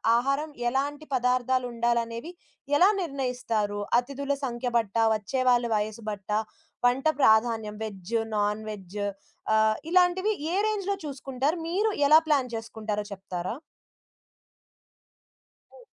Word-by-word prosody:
ఆహారం 275 +5 0 0.2
ఎలాంటి 285 +4 -1
పదార్థాలుండాలనేవి 245 0 0 0.5
ఎలా 365 +6 +6
నిర్ణయిస్తారు? 250 - -2 0.2
అతిథుల 280 +2 -3
సంఖ్య 245 -1 -2
బట్టా? 225 0 +1
వచ్చే 215 +5 -2
వాళ్ళ 245 -1 +4
వయసు 215 +2 -2
బట్టా? 210 +1 -2 0.5
వంట 255 +3 0 0.2
ప్రాధాన్యం 220 -2 +3
వెజ్, 200 -1 -7 0.2
నాన్ 210 +1 0
వెజ్ 200 -1 -7 0.6
ఆహ్, 220 0 +3
ఇలాంటివి 365 +3 +3 0.2
ఏ - - +1
రేంజ్‌లో 400 -2 -1
చూసుకుంటారు? 275 +3 -2
మీరు 415 +5 +1 0.2
ఎలా 310 +2 +8
ప్లాన్ 270 -5 +1
చేసుకుంటారో 220 -2 -4
చెప్తారా? 185 0 -5 2.2
హ్మ్. - - -16
245 Hz, 105 wpm, -27 LUFS, 215-280 Hz, 2.2 s, ఎలా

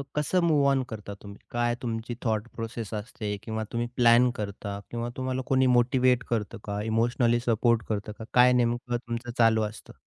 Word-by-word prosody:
कसं 150 +5 +1
move 150 -4 +3
on 135 -1 +2
करता 105 -2 -7
तुम्ही? 100 0 -10
काय 120 0 0
तुमची 115 0 -4
थॉट 110 0 0
प्रोसेस 115 -1 -5
असते 105 -1 -4
किंवा 110 -1 -3
तुम्ही 120 0 -1
प्लॅन 120 +1 +5
करता 100 0 -5
किंवा 120 0 -3
तुम्हाला 130 0 -2
कोणी 130 0 +4
मोटिव्हेट 125 0 +3
करतं 115 -1 -2
का? 100 0 -3
इमोशनली 115 +2 +1
सपोर्ट 115 -1 +2
करतं 105 -1 -2
का? - - -6
काय 125 0 +6
नेमकं 120 0 0
तुमचं 120 +1 -4
चालू 115 -1 +4
असतं? 105 - -13
120 Hz, 175 wpm, -27 LUFS, 110-125 Hz, -, काय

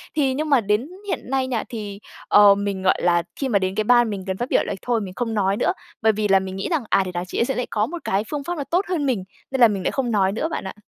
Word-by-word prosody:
Thì 275 -4 +2
nhưng 305 +3 -2
mà 275 -4 +5
đến 210 +5 0 0.2
hiện - - -1
nay 265 -1 0
nha, 240 -4 -1
thì, 210 -4 -6 0.3
ờ, 205 -1 +7
mình, 200 -1 -3
gọi 190 - +2
là, 175 -1 +3
khi 270 - -2
mà 205 -4 +3
đến 190 0 -2
cái 215 - +1
ban 240 +1 +4
mình 200 -3 -4
cần 190 0 -2
phát 245 +4 -3
biểu - - +3
là - - -3
thôi 240 -2 0
mình 190 -3 -6
không 235 -2 -2
nói 200 -2 +1
nữa. - - +2 0.3
Bởi 220 - +5
vì 215 0 -1
là 195 -1 +5
mình 190 0 -6
nghĩ 195 - -3
rằng, 320 -7 0
à, 195 - +3
thể 185 - -5
nảo 175 0 -2
chị - - -4
ấy - - +3
sẽ 270 - -2
lại 250 - -2
có 210 -1 +1
một 345 +3 -7
cái 195 +2 0
phương 295 -2 -3
pháp 350 +3 -4
nó 285 - -2
tốt 355 +7 0
hơn 330 -6 0
mình, 240 -8 0 0.3
nên 265 -1 -1
là 235 - +9
mình 200 -3 -3
lại - - 0
không 255 -3 -1
nói 195 -3 +2
nữa 230 +10 -2
bạn - - -4
ạ. 190 - -6
215 Hz, 320 wpm, -22 LUFS, 195-265 Hz, 0.3 s, là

